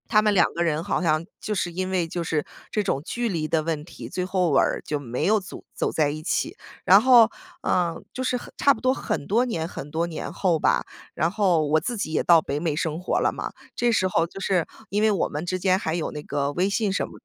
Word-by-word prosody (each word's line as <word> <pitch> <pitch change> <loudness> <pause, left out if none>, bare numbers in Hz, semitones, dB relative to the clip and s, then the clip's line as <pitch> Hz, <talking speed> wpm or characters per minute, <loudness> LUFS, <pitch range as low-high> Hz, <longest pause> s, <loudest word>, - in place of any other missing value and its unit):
他 215 -2 +6
们 210 -1 +2
两 195 - +3
个 170 - -3
人 160 -2 +1
好 - - -1
像 155 -1 +1
就 210 - -3
是 175 -2 -1
因 185 +2 -3
为 185 -2 +1
就 170 +1 -4
是 160 -3 -1 0.2
这 210 - 0
种 140 - -1
距 240 +4 -2
离 160 -5 -2
的 160 0 +1
问 155 -2 -3
题， - - -10
最 180 - -2
后 185 -2 +1
尾 135 -2 +4
儿 - - +1
就 150 - -2
没 125 -3 -3
有 215 +2 +4
组 185 - -10
走 - - -1
在 150 -2 +1
一 155 +1 -5
起。 160 - -1 0.3
然 195 +3 +7
后， 235 -2 +7 0.3
呃， 175 -2 +1 0.2
就 255 - -4
是 255 0 0
很 245 - -7
差 280 - +5
不 220 - -11
多 255 +1 +3
很 145 - -3
多 230 - +2
年 170 -10 -2
很 150 -4 -7
多 160 +3 -1
年 165 - -6
后 175 -5 +1
吧， - - +2 0.3
然 165 +3 0
后 180 -6 +2
我 155 +2 +3
自 240 - -3
己 200 -7 -3
也 155 - +1
到 170 -2 +6
北 145 -1 -3
美 160 -2 -1
生 160 0 -2
活 180 - 0
了 - - +2
嘛。 - - -5 0.2
这 240 - +1
时 190 - +2
候 165 -2 +1
就 195 - -10
是， 185 -4 +1 0.2
因 205 +2 0
为 220 - +4
我 195 - 0
们 150 +3 -4
之 185 +1 -1
间 185 0 +2
还 160 -4 -2
有 170 - -2
那 150 - -6
个 140 -1 -1
微 180 +6 +1
信 205 0 0
什 200 - -1
么 - - -14
175 Hz, 280 characters per minute, -24 LUFS, 155-200 Hz, 0.3 s, 然